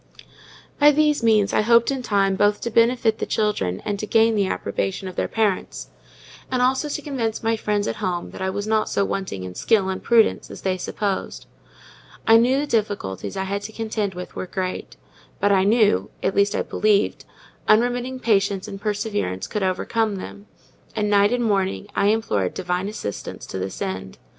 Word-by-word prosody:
By 295 Hz, 0 st, +8 dB
these 300 Hz, -1 st, +3 dB
means 215 Hz, -3 st, +3 dB
I -, -, +3 dB
hoped 235 Hz, +3 st, +4 dB
in 270 Hz, -1 st, -2 dB
time 200 Hz, -4 st, +1 dB
both 205 Hz, +1 st, +2 dB
to 235 Hz, -, -3 dB
benefit 230 Hz, -1 st, +3 dB
the -, -, -2 dB
children 95 Hz, -, -1 dB
and 205 Hz, -1 st, -2 dB
to 215 Hz, -, -4 dB
gain 225 Hz, +1 st, +4 dB
the 200 Hz, -3 st, +1 dB
approbation 190 Hz, 0 st, -3 dB
of 185 Hz, -, -7 dB
their -, -, -1 dB
parents; 210 Hz, -, -1 dB, 0.6 s
and 255 Hz, -, 0 dB
also 265 Hz, +4 st, +2 dB
to 300 Hz, -, -3 dB
convince 240 Hz, -8 st, -3 dB
my 225 Hz, 0 st, +2 dB
friends 210 Hz, -1 st, -1 dB
at -, -, -3 dB
home 180 Hz, -4 st, -3 dB
that -, -, -9 dB
I 190 Hz, -, 0 dB
was 205 Hz, +2 st, -3 dB
not 215 Hz, 0 st, +1 dB
so 200 Hz, -, +1 dB
wanting 190 Hz, -, -4 dB
in 90 Hz, 0 st, -7 dB
skill 195 Hz, -, +2 dB
and 190 Hz, -, -3 dB
prudence 230 Hz, -2 st, +3 dB
as -, -, -10 dB
they 190 Hz, -1 st, +1 dB
supposed. 200 Hz, +1 st, -3 dB, 0.8 s
I 225 Hz, 0 st, +7 dB
knew 250 Hz, +4 st, +3 dB
the -, -, -1 dB
difficulties 205 Hz, -, -2 dB
I 190 Hz, -, -1 dB
had 200 Hz, +1 st, -3 dB
to 205 Hz, +2 st, -7 dB
contend 215 Hz, -3 st, -3 dB
with 180 Hz, 0 st, -8 dB
were 185 Hz, -, -4 dB
great; 185 Hz, 0 st, -4 dB, 0.4 s
but 205 Hz, -, +2 dB
I 190 Hz, -1 st, +4 dB
knew 205 Hz, -, +3 dB
(at 190 Hz, -, +1 dB
least 200 Hz, +1 st, +3 dB
I -, -, 0 dB
believed) 210 Hz, -1 st, +1 dB, 0.4 s
unremitting 245 Hz, +3 st, +2 dB
patience 200 Hz, -3 st, +1 dB
and 195 Hz, -1 st, -8 dB
perseverance 205 Hz, -, -2 dB
could 210 Hz, -, -3 dB
overcome 205 Hz, +3 st, 0 dB
them; 200 Hz, +2 st, -9 dB, 0.5 s
and 210 Hz, -1 st, 0 dB
night 205 Hz, +1 st, +4 dB
and 245 Hz, 0 st, 0 dB
morning 195 Hz, -2 st, 0 dB
I 200 Hz, -, +2 dB
implored 155 Hz, -, 0 dB
Divine 180 Hz, +2 st, -2 dB
assistance 155 Hz, -, -6 dB
to 95 Hz, -, -6 dB
this 95 Hz, +1 st, -5 dB
end. 95 Hz, 0 st, -5 dB
205 Hz, 190 wpm, -22 LUFS, 190-225 Hz, 0.8 s, By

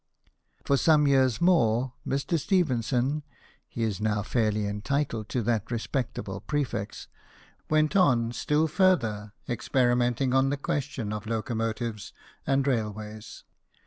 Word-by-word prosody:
For 140 Hz, -, +3 dB
some 150 Hz, 0 st, +4 dB
years 130 Hz, -3 st, +3 dB
more, 130 Hz, -8 st, +3 dB
Mr. 140 Hz, +5 st, 0 dB
Stephenson 140 Hz, -, +1 dB, 0.5 s
(he 115 Hz, -, -4 dB
is 105 Hz, -3 st, -2 dB
now 105 Hz, -1 st, 0 dB
fairly 105 Hz, -2 st, 0 dB
entitled 110 Hz, +2 st, -2 dB
to 125 Hz, -, -1 dB
that 110 Hz, -1 st, 0 dB
respectable 115 Hz, -4 st, -3 dB
prefix) 120 Hz, -4 st, -3 dB, 0.6 s
went 155 Hz, +1 st, +2 dB
on 125 Hz, -11 st, +3 dB
still 150 Hz, +5 st, +1 dB
further 120 Hz, -, +1 dB
experimenting 120 Hz, +1 st, +1 dB
on 135 Hz, 0 st, +3 dB
the 145 Hz, -, -1 dB
question 130 Hz, -6 st, -3 dB
of 105 Hz, 0 st, -6 dB
locomotives 115 Hz, -1 st, -3 dB, 0.3 s
and 135 Hz, 0 st, +2 dB
railways. 110 Hz, -4 st, -3 dB
120 Hz, 115 wpm, -27 LUFS, 110-140 Hz, 0.6 s, some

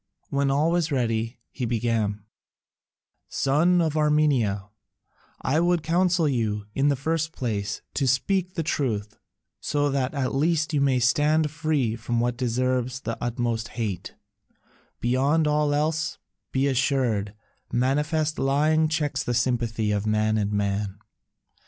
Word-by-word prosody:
When 140 Hz, -1 st, +1 dB
all 150 Hz, +4 st, +2 dB
was 170 Hz, -2 st, +1 dB
ready 115 Hz, -2 st, -1 dB
he 130 Hz, -, -6 dB
began: 110 Hz, -3 st, -1 dB, 1.1 s
"Son 170 Hz, +6 st, +2 dB
of 155 Hz, -2 st, -1 dB
Armenia, 145 Hz, -10 st, +2 dB, 0.8 s
I 150 Hz, +4 st, +2 dB
would 175 Hz, -1 st, +2 dB
counsel 175 Hz, 0 st, +2 dB
you, 110 Hz, -6 st, -1 dB
in 135 Hz, +1 st, +2 dB
the 145 Hz, -, +3 dB
first 160 Hz, +4 st, -1 dB
place, 105 Hz, -8 st, -3 dB
to 140 Hz, -, 0 dB
speak 180 Hz, +8 st, +1 dB
the 165 Hz, -, -1 dB
truth, 110 Hz, -9 st, -2 dB, 0.4 s
so 145 Hz, -1 st, 0 dB
that 135 Hz, +1 st, -1 dB
at 135 Hz, -2 st, -1 dB
least 155 Hz, +2 st, +1 dB
you 145 Hz, -, +2 dB
may 135 Hz, -2 st, +3 dB
stand 150 Hz, +4 st, +2 dB
free 150 Hz, -7 st, 0 dB
from 115 Hz, 0 st, -2 dB
what 120 Hz, 0 st, 0 dB
deserves 125 Hz, +1 st, -1 dB
the 115 Hz, -2 st, -3 dB
utmost 120 Hz, -2 st, -1 dB
hate: 105 Hz, -6 st, -3 dB, 0.8 s
beyond 140 Hz, +6 st, +2 dB
all 150 Hz, 0 st, +2 dB
else, 155 Hz, +2 st, 0 dB, 0.3 s
be 135 Hz, +1 st, +1 dB
assured, 125 Hz, -6 st, 0 dB, 0.4 s
manifest 150 Hz, +5 st, 0 dB
lying 150 Hz, +4 st, +3 dB
checks 145 Hz, -3 st, -1 dB
the 120 Hz, -, -1 dB
sympathy 115 Hz, -3 st, 0 dB
of 105 Hz, +1 st, -1 dB
man 110 Hz, 0 st, +2 dB
and 105 Hz, -1 st, 0 dB
man. 100 Hz, -1 st, -1 dB
135 Hz, 135 wpm, -25 LUFS, 115-150 Hz, 1.1 s, the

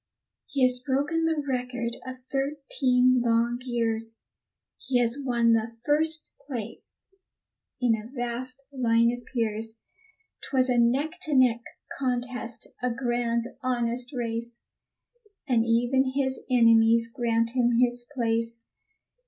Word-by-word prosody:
He 275 Hz, -2 st, 0 dB
has 250 Hz, 0 st, +5 dB
broken 290 Hz, +5 st, 0 dB
the 320 Hz, -2 st, 0 dB
record 245 Hz, -2 st, -2 dB
of 255 Hz, 0 st, -8 dB
thirteen 265 Hz, -3 st, +2 dB
long 235 Hz, +1 st, +1 dB
years; 225 Hz, -2 st, -1 dB, 0.6 s
He 260 Hz, -, 0 dB
has 240 Hz, +2 st, +2 dB
won 235 Hz, -3 st, +3 dB
the 225 Hz, +1 st, 0 dB
first 310 Hz, +2 st, +2 dB
place 230 Hz, -6 st, -6 dB, 0.8 s
in 245 Hz, -2 st, +3 dB
a 220 Hz, +1 st, -8 dB
vast 255 Hz, +1 st, -4 dB
line 235 Hz, -2 st, +3 dB
of 245 Hz, 0 st, -7 dB
peers. 225 Hz, -2 st, -2 dB, 0.6 s
'Twas 260 Hz, -1 st, +1 dB
a 245 Hz, -1 st, +3 dB
neck 280 Hz, +9 st, +1 dB
to 310 Hz, -5 st, 0 dB
neck 245 Hz, -3 st, +4 dB, 0.4 s
contest, 250 Hz, -2 st, -2 dB, 0.2 s
a 250 Hz, -, +1 dB
grand, 240 Hz, -1 st, -1 dB
honest 245 Hz, 0 st, -1 dB
race, 235 Hz, -2 st, -4 dB, 0.9 s
And 235 Hz, -4 st, +2 dB
even 250 Hz, +3 st, +2 dB
his 265 Hz, -1 st, 0 dB
enemies 230 Hz, -1 st, +5 dB
grant 230 Hz, -1 st, 0 dB
him 240 Hz, -1 st, +2 dB
his 240 Hz, 0 st, +1 dB
place. 230 Hz, -3 st, -1 dB
245 Hz, 120 wpm, -27 LUFS, 230-260 Hz, 0.9 s, has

